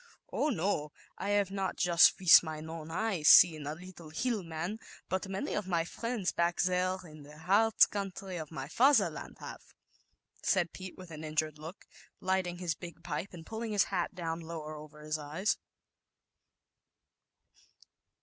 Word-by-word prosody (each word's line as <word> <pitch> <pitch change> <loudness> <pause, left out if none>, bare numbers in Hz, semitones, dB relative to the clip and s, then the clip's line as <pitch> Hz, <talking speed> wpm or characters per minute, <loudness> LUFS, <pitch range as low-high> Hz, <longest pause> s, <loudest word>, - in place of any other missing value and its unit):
"Oh, 305 - +1
no, 170 - -1 0.3
I 200 - -3
have 200 -2 0
not 195 -1 -2
just 175 -1 +5
with 180 -3 +9
mein 155 -1 -6
own 165 -1 -7
eyes 175 -3 -1
seen 155 -4 +7
a 150 - -3
little 175 -2 -12
<Hill 220 +7 -1
Man,' 170 +5 -5 0.3
but 190 +1 -2
many 195 0 -3
of 210 -3 -2
my 170 -3 +1
friends, 230 0 -2
back 170 0 0
there 185 0 +1
in 155 -3 -12
the 150 +1 -13
Hartz 205 +7 +4
country 195 -2 -5
of 155 -3 -6
my 135 -4 -6
Fatherland 265 - +2
haveJl - - -8 0.8
said 175 -4 +1
Pete, 185 -1 -9
with 185 -2 -11
an 155 0 -8
injured 155 -1 -2
look, 160 +5 -10 0.3
ligl 185 -1 0
o - - -9
his 175 -2 -2
big 170 0 -11
pipe 160 +6 -4
and 165 -3 -10
pulling 220 +2 -4
his 205 - +4
hat 180 0 -1
down 165 -2 -3
lower 160 -2 -7
over 150 0 -11
his 155 0 -3
eyes. 155 +8 -1
175 Hz, 165 wpm, -31 LUFS, 155-190 Hz, 0.8 s, with